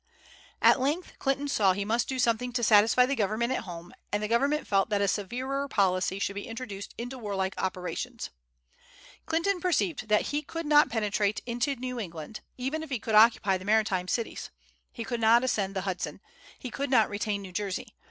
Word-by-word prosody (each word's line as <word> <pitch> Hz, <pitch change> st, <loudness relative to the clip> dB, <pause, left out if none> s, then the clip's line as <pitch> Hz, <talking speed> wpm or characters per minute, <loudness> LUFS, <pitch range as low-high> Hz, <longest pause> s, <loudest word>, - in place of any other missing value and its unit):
At -, -, +6 dB
length 295 Hz, +7 st, -2 dB
Clinton 275 Hz, +1 st, 0 dB
saw 200 Hz, -9 st, +3 dB
he 200 Hz, +2 st, -3 dB
must 230 Hz, +3 st, 0 dB
do 265 Hz, -, -2 dB
something 245 Hz, 0 st, +1 dB
to 240 Hz, -1 st, -1 dB
satisfy 225 Hz, +3 st, +6 dB
the 270 Hz, -, -1 dB
government 225 Hz, +3 st, 0 dB
at -, -, -3 dB
home, 175 Hz, -1 st, -9 dB, 0.2 s
and 205 Hz, +1 st, -1 dB
the -, -, 0 dB
government 280 Hz, +7 st, +1 dB
felt 195 Hz, +2 st, +2 dB
that 205 Hz, -2 st, +1 dB
a 200 Hz, -, +2 dB
severer 255 Hz, +8 st, -2 dB
policy 190 Hz, -5 st, +1 dB
should 200 Hz, 0 st, -1 dB
be 200 Hz, 0 st, -6 dB
introduced 225 Hz, -4 st, -7 dB
into 245 Hz, +2 st, -6 dB
warlike 195 Hz, -4 st, -2 dB
operations. 185 Hz, -1 st, -4 dB, 1.0 s
Clinton 345 Hz, +4 st, +1 dB
perceived 345 Hz, -, 0 dB
that 210 Hz, -1 st, +2 dB
he 295 Hz, -, +1 dB
could 330 Hz, +1 st, -6 dB
not 295 Hz, -1 st, +5 dB
penetrate 210 Hz, -2 st, 0 dB
into 245 Hz, +4 st, -1 dB
New 250 Hz, 0 st, -5 dB
England, 170 Hz, -1 st, -7 dB, 0.2 s
even 270 Hz, +5 st, -2 dB
if 315 Hz, -, -7 dB
he 260 Hz, -, -1 dB
could 220 Hz, 0 st, -4 dB
occupy 215 Hz, -3 st, +5 dB
the 185 Hz, -, -10 dB
maritime 205 Hz, -4 st, +2 dB
cities. 230 Hz, +3 st, -3 dB, 0.4 s
He 230 Hz, -, -6 dB
could 235 Hz, 0 st, -3 dB
not 230 Hz, +2 st, +5 dB
ascend 200 Hz, -6 st, -1 dB
the 190 Hz, -, -1 dB
Hudson. 185 Hz, -1 st, -4 dB, 0.4 s
He 250 Hz, -, -7 dB
could 280 Hz, +1 st, -3 dB
not 230 Hz, -5 st, +5 dB
retain 205 Hz, 0 st, -2 dB
New 185 Hz, -, -9 dB
Jersey. 205 Hz, +4 st, -4 dB
225 Hz, 190 wpm, -28 LUFS, 200-260 Hz, 1.0 s, At